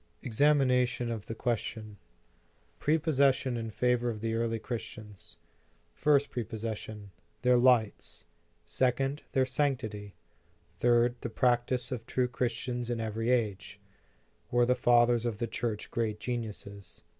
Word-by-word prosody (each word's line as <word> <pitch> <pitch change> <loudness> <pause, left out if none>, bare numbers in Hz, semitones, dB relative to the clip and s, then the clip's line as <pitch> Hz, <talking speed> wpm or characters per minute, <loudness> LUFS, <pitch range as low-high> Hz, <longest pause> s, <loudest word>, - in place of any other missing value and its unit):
EXAMINATION 125 -2 +2
OF 110 -3 -5
THE 115 - -5
QUESTION 110 -2 -3 0.8
PREPOSSESSIONS 135 -6 +2
IK - - -7
FAVOR 125 +1 +1
OF 110 -2 -4
THE 115 +1 -2
EAKLY 115 0 0
CHRISTIANS 110 -3 -8 0.6
FlRST 145 -1 +3
PREPOSSESSION, 110 -2 -5 0.3
THEIR 125 0 +5
LIGHTS 120 -4 +2 0.4
SECOND, 135 +3 0
THEIR 130 -2 +3
SANCTITY 125 -7 -2 0.6
THIRD, 120 +5 +2
THE 120 - -3
PRACTICE 125 +1 +1
OF 115 -3 -5
TRUE 125 -1 0
CHRISTIANS 120 0 -2
IN 120 -1 -1
EVERY 115 +1 -2
AGE 100 -5 -1 0.7
WERE 120 0 +3
THE 125 - +3
FATHERS 120 -1 +3
OF 110 -3 -3
THE 120 - -1
CHURCH 115 -1 -4
GREAT 110 -2 -1
GENIUSES? 105 -4 -6
120 Hz, 120 wpm, -30 LUFS, 110-125 Hz, 0.8 s, THEIR